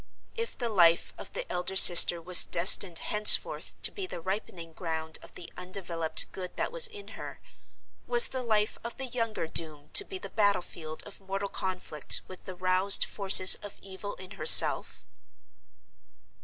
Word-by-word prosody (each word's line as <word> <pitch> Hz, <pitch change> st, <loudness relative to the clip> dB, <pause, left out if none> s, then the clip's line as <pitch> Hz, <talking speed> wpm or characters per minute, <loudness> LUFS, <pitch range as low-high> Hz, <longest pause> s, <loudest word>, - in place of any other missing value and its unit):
If 460 Hz, 0 st, -7 dB
the 240 Hz, -3 st, -4 dB
life 170 Hz, -5 st, +1 dB
of -, -, -11 dB
the -, -, -6 dB
elder 180 Hz, +2 st, -5 dB
sister 175 Hz, -2 st, +6 dB
was 175 Hz, +2 st, +5 dB
destined 175 Hz, 0 st, +1 dB
henceforth 210 Hz, +4 st, +3 dB
to -, -, +1 dB
be 390 Hz, -2 st, -8 dB
the 175 Hz, -, -9 dB
ripening 175 Hz, -2 st, -8 dB
ground 160 Hz, -2 st, -7 dB
of -, -, -16 dB
the 175 Hz, -, -11 dB
undeveloped 180 Hz, -3 st, -2 dB
Good 180 Hz, -1 st, -10 dB
that -, -, -4 dB
was -, -, +5 dB
in 420 Hz, -3 st, -13 dB
her—was 480 Hz, 0 st, -4 dB
the 260 Hz, -, -6 dB
life 215 Hz, -3 st, -3 dB
of 235 Hz, -, -8 dB
the 265 Hz, -, -6 dB
younger 230 Hz, -7 st, -5 dB
doomed 155 Hz, -2 st, -4 dB
to 410 Hz, -, +6 dB
be 385 Hz, -1 st, -9 dB
the 370 Hz, -, -11 dB
battle 205 Hz, -4 st, -1 dB
field 155 Hz, -1 st, -8 dB
of 205 Hz, -, -14 dB
mortal 195 Hz, +1 st, -7 dB
conflict 185 Hz, -6 st, -3 dB
with 185 Hz, -, -14 dB
the 185 Hz, -, -10 dB
roused 185 Hz, +2 st, -1 dB
forces 190 Hz, -2 st, +6 dB
of 205 Hz, -, -12 dB
Evil 195 Hz, +1 st, -9 dB
in 185 Hz, +1 st, -14 dB
herself? 455 Hz, -, +3 dB
190 Hz, 165 wpm, -26 LUFS, 175-220 Hz, -, sister